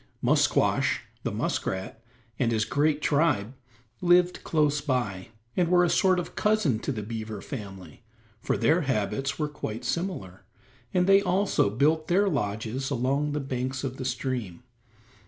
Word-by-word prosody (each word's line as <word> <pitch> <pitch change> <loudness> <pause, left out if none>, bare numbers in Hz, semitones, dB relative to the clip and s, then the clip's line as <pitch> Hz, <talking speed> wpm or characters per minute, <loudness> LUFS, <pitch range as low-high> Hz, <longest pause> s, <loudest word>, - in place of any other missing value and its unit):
Musquash, - - +2 0.2
the - - -2
muskrat, 95 +4 -3 0.4
and 120 -3 +2
his 110 -2 +1
great 150 +1 +1
tribe 140 -8 +2 0.5
lived 180 0 +3
close 150 -2 +1
by, 120 -10 -2 0.3
and 175 -2 +2
were 180 0 +5
a 175 - +2
sort 185 -1 +3
of 175 - -4
cousin 210 - +2
to 140 - -3
the 110 -5 -4
beaver 110 0 -5
family, 100 -8 -8 0.4
for - - 0
their 165 +3 +3
habits 135 0 -1
were 150 - 0
quite 125 -5 -6
similar, 145 - -3 0.5
and 180 -1 +2
they 195 +1 +6
also 190 - +2
built 150 +9 +1
their 195 +3 +3
lodges 120 - -2
along 140 +3 0
the 150 - -1
banks 130 -1 -3
of 130 -1 -4
the 130 - -5
stream. 125 -6 -3
135 Hz, 150 wpm, -27 LUFS, 115-170 Hz, 0.5 s, they